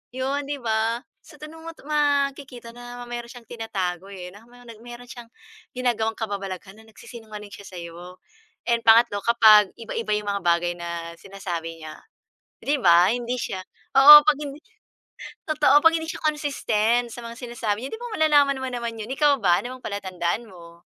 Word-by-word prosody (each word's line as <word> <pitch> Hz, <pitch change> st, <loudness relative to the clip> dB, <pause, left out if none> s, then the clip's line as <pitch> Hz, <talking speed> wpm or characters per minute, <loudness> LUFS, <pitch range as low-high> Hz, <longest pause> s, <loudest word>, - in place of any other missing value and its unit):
'Yun, 275 Hz, +2 st, -2 dB
di 290 Hz, -, -1 dB
ba? 225 Hz, +1 st, -1 dB, 0.2 s
So 315 Hz, -1 st, -17 dB
tanong 320 Hz, +2 st, -11 dB
mo -, -, -5 dB
'to -, -, -19 dB
makikita 280 Hz, -5 st, -1 dB
na 245 Hz, 0 st, -9 dB
meron 240 Hz, 0 st, -6 dB
siyang 245 Hz, -2 st, -12 dB
tinatago, 195 Hz, -6 st, -4 dB
eh, 180 Hz, -2 st, -8 dB
na 205 Hz, -, -14 dB
may 245 Hz, 0 st, -17 dB, 0.2 s
meron 240 Hz, 0 st, -10 dB
siyang 240 Hz, -1 st, -10 dB, 0.5 s
ginagawang 230 Hz, -3 st, -1 dB
kababalaghan 195 Hz, -2 st, -6 dB
na 220 Hz, -, -17 dB
nagsisinungaling 215 Hz, -2 st, -11 dB
siya 200 Hz, -, -11 dB
sa'yo. 175 Hz, +1 st, -10 dB, 0.5 s
And 235 Hz, 0 st, +3 dB
pangatlo 225 Hz, -2 st, +5 dB
kapag 215 Hz, -4 st, +6 dB
iba-iba 225 Hz, -1 st, -5 dB
'yung 210 Hz, -1 st, -4 dB
mga 200 Hz, -, -2 dB
bagay 175 Hz, 0 st, +2 dB
na 170 Hz, -1 st, -6 dB
sinasabi 170 Hz, -4 st, -7 dB
niya, 155 Hz, 0 st, -8 dB, 0.7 s
di 290 Hz, +1 st, +1 dB
ba? 175 Hz, 0 st, +6 dB
Hindi 245 Hz, +1 st, -2 dB
siya 190 Hz, -4 st, -4 dB, 0.4 s
oo, 295 Hz, +2 st, +12 dB
'pag 305 Hz, -, +5 dB
hindi 290 Hz, -1 st, -7 dB, 0.9 s
totoo, 295 Hz, -2 st, +4 dB
pag 325 Hz, -, +7 dB
hindi 320 Hz, -1 st, -3 dB
siya -, -, -8 dB
consistent 245 Hz, -6 st, 0 dB
sa 240 Hz, -, -8 dB
mga 230 Hz, 0 st, -8 dB
sinasabi 235 Hz, -3 st, -4 dB
niya -, -, -8 dB
di -, -, -18 dB
ba, 485 Hz, -, -6 dB
malalaman 290 Hz, -3 st, +4 dB
mo 260 Hz, -, -3 dB
naman 235 Hz, -1 st, -4 dB
'yun. 220 Hz, +2 st, -7 dB
Ikaw 290 Hz, +1 st, +3 dB
ba 175 Hz, -3 st, +3 dB
ano 255 Hz, +1 st, -7 dB
palatandaan 190 Hz, +1 st, -3 dB
mo? 170 Hz, -2 st, -15 dB
230 Hz, 170 wpm, -24 LUFS, 195-265 Hz, 0.9 s, oo